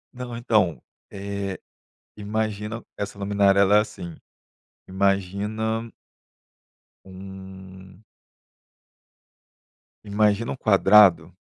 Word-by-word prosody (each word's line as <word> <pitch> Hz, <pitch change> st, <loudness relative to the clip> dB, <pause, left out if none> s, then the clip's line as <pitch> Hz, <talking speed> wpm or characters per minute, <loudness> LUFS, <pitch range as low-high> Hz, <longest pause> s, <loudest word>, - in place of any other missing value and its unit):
Não, 125 Hz, -2 st, -6 dB
então, 105 Hz, -, +1 dB, 0.3 s
eh, 100 Hz, -1 st, -5 dB, 0.6 s
imagina 105 Hz, +1 st, -4 dB
essa 100 Hz, 0 st, -6 dB
luminária 100 Hz, 0 st, +2 dB
ela 100 Hz, +1 st, +5 dB
é -, -, +5 dB
assim: 85 Hz, -5 st, -7 dB, 0.7 s
imagina 100 Hz, +4 st, -1 dB, 1.2 s
um 95 Hz, 0 st, -12 dB, 2.0 s
imagina 105 Hz, +2 st, +1 dB
um -, -, -6 dB
quadrado 100 Hz, -, +5 dB
100 Hz, 75 wpm, -24 LUFS, 95-110 Hz, 2.0 s, ela